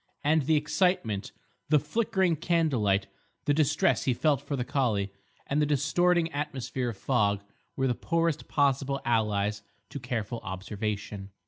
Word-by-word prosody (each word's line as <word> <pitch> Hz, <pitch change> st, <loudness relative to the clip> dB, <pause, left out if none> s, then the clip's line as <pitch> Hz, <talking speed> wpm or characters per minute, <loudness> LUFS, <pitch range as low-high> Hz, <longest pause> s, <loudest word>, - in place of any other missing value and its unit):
And 150 Hz, -1 st, +2 dB
the 160 Hz, -, +4 dB
excitement, 150 Hz, -, +1 dB, 0.4 s
the 150 Hz, -, +6 dB
flickering 190 Hz, +2 st, +1 dB
candlelight, 135 Hz, -, +1 dB, 0.4 s
the 145 Hz, -, +3 dB
distress 150 Hz, -2 st, +2 dB
he 130 Hz, -, +2 dB
felt 145 Hz, 0 st, +2 dB
for 145 Hz, -, -3 dB
the 125 Hz, -2 st, -2 dB
collie, 105 Hz, -9 st, 0 dB, 0.3 s
and 145 Hz, +2 st, 0 dB
the -, -, +4 dB
distorting 165 Hz, +4 st, +2 dB
atmosphere 135 Hz, -3 st, -3 dB
of 110 Hz, -, -7 dB
fog 100 Hz, -6 st, +1 dB, 0.3 s
were 135 Hz, -, 0 dB
the 125 Hz, -, +2 dB
poorest 165 Hz, +3 st, -1 dB
possible 140 Hz, -1 st, +1 dB
allies 105 Hz, -3 st, +1 dB, 0.3 s
to 140 Hz, -, -5 dB
careful 120 Hz, -2 st, -3 dB
observation. 100 Hz, 0 st, -4 dB
135 Hz, 140 wpm, -28 LUFS, 105-150 Hz, 0.4 s, the